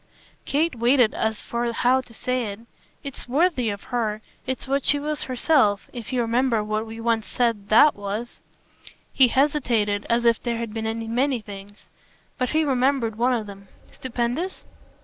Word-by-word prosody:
Kate 315 Hz, +3 st, +1 dB
waited 240 Hz, 0 st, +3 dB
as 220 Hz, -1 st, -2 dB
for 235 Hz, 0 st, -2 dB
how 250 Hz, +3 st, +2 dB
to 250 Hz, -, -16 dB
say 250 Hz, +2 st, -2 dB
it. 200 Hz, +2 st, -7 dB, 0.4 s
"It's 275 Hz, -3 st, -7 dB
worthy 275 Hz, -4 st, +2 dB
of 200 Hz, -1 st, -5 dB
her. 215 Hz, -3 st, -1 dB, 0.2 s
It's 260 Hz, +1 st, -3 dB
what 275 Hz, 0 st, 0 dB
she 290 Hz, -, +3 dB
was 300 Hz, +1 st, -3 dB
herself 255 Hz, -5 st, +1 dB
if 240 Hz, -2 st, -7 dB
you 250 Hz, -1 st, +1 dB
remember 235 Hz, -1 st, +1 dB
what 215 Hz, +1 st, -2 dB
we 225 Hz, +1 st, -8 dB
once 225 Hz, -1 st, 0 dB
said 230 Hz, -5 st, -1 dB
THAT 290 Hz, +7 st, +7 dB
was." 205 Hz, +4 st, -5 dB, 0.7 s
He 265 Hz, -, +6 dB
hesitated 240 Hz, -7 st, +1 dB
as 235 Hz, 0 st, +2 dB
if 230 Hz, -1 st, +3 dB
there 235 Hz, -1 st, -2 dB
had 230 Hz, -2 st, -5 dB
been 225 Hz, 0 st, -3 dB
many 260 Hz, +1 st, +1 dB
things. 205 Hz, 0 st, -11 dB, 0.5 s
But 255 Hz, -1 st, 0 dB
he 315 Hz, +1 st, +2 dB
remembered 260 Hz, -4 st, +1 dB
one 245 Hz, +2 st, +2 dB
of 220 Hz, -3 st, -3 dB
them. 200 Hz, -1 st, -11 dB, 0.2 s
"Stupendous?" 255 Hz, +8 st, -3 dB
235 Hz, 170 wpm, -24 LUFS, 220-260 Hz, 0.7 s, THAT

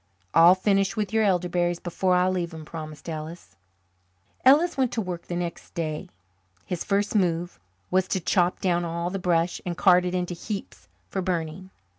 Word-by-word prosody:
"I'll 170 Hz, +2 st, +8 dB
finish 195 Hz, +2 st, +1 dB
with 210 Hz, -1 st, -2 dB
your 220 Hz, 0 st, +3 dB
elderberries 175 Hz, -2 st, +1 dB
before 180 Hz, +1 st, 0 dB
I 180 Hz, 0 st, +3 dB
leave 180 Hz, -2 st, -1 dB
them," 160 Hz, -2 st, -9 dB
promised 155 Hz, -1 st, -8 dB
Ellis. 155 Hz, -, -7 dB, 0.9 s
Ellis 300 Hz, +7 st, +5 dB
went 260 Hz, -3 st, +1 dB
to -, -, -1 dB
work 180 Hz, -5 st, -4 dB
the 175 Hz, -, -3 dB
next 175 Hz, -1 st, -5 dB
day. 155 Hz, -2 st, -3 dB, 0.6 s
His 180 Hz, -2 st, -3 dB
first 200 Hz, 0 st, 0 dB
move 175 Hz, -3 st, 0 dB, 0.3 s
was 185 Hz, 0 st, +2 dB
to 190 Hz, -, 0 dB
chop 180 Hz, +1 st, +1 dB
down 175 Hz, -2 st, +1 dB
all 170 Hz, +1 st, -3 dB
the 195 Hz, -, -3 dB
brush 175 Hz, -1 st, +1 dB
and 175 Hz, -2 st, -4 dB
cart 180 Hz, -2 st, +5 dB
it 180 Hz, 0 st, -2 dB
into 180 Hz, 0 st, -1 dB
heaps 195 Hz, -, -7 dB, 0.2 s
for 190 Hz, -, -3 dB
burning. 180 Hz, 0 st, -3 dB
180 Hz, 175 wpm, -25 LUFS, 170-190 Hz, 0.9 s, I'll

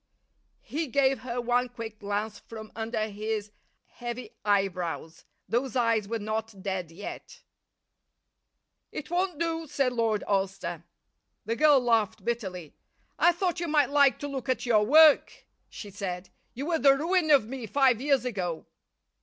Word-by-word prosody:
He 310 Hz, +2 st, -3 dB
gave 270 Hz, 0 st, +2 dB
her 245 Hz, 0 st, -4 dB
one 245 Hz, +1 st, +1 dB
quick 225 Hz, -3 st, -8 dB
glance 205 Hz, +1 st, -3 dB
from 220 Hz, -1 st, -10 dB
under 220 Hz, -1 st, -2 dB
his 210 Hz, 0 st, -4 dB, 0.3 s
heavy 240 Hz, 0 st, -7 dB
eyebrows. 180 Hz, -5 st, -1 dB, 0.2 s
Those 255 Hz, +3 st, -1 dB
eyes 230 Hz, -4 st, +2 dB
were 230 Hz, +2 st, -2 dB
not 215 Hz, -2 st, -4 dB
dead 190 Hz, -4 st, -3 dB
yet. 205 Hz, -, -9 dB, 1.5 s
"It 305 Hz, -, -7 dB
won't 360 Hz, -2 st, 0 dB
do," 330 Hz, 0 st, -2 dB
said 270 Hz, -2 st, 0 dB
Lord 225 Hz, -3 st, 0 dB
Alcester. 190 Hz, -4 st, -2 dB, 0.6 s
The 225 Hz, +2 st, -1 dB
girl 295 Hz, +2 st, +5 dB
laughed 220 Hz, -4 st, +1 dB
bitterly. 190 Hz, -, -4 dB, 0.5 s
"I 345 Hz, -, +6 dB
thought 355 Hz, 0 st, -1 dB
you 345 Hz, -, -2 dB
might 295 Hz, -4 st, +2 dB
like 280 Hz, -2 st, +5 dB
to 290 Hz, -, -3 dB
look 270 Hz, -2 st, -5 dB
at 255 Hz, -, 0 dB
your 220 Hz, -3 st, +4 dB
work," 305 Hz, +6 st, +5 dB, 0.2 s
she 205 Hz, -, -9 dB
said. 185 Hz, -2 st, -5 dB, 0.2 s
"You 270 Hz, +4 st, -4 dB
were 330 Hz, -1 st, 0 dB
the 275 Hz, -2 st, +5 dB
ruin 335 Hz, +2 st, +1 dB
of 280 Hz, -7 st, +6 dB
me 245 Hz, 0 st, -6 dB
five 255 Hz, -1 st, +3 dB
years 275 Hz, -2 st, +2 dB
ago." 180 Hz, -9 st, -3 dB
235 Hz, 150 wpm, -28 LUFS, 205-275 Hz, 1.5 s, I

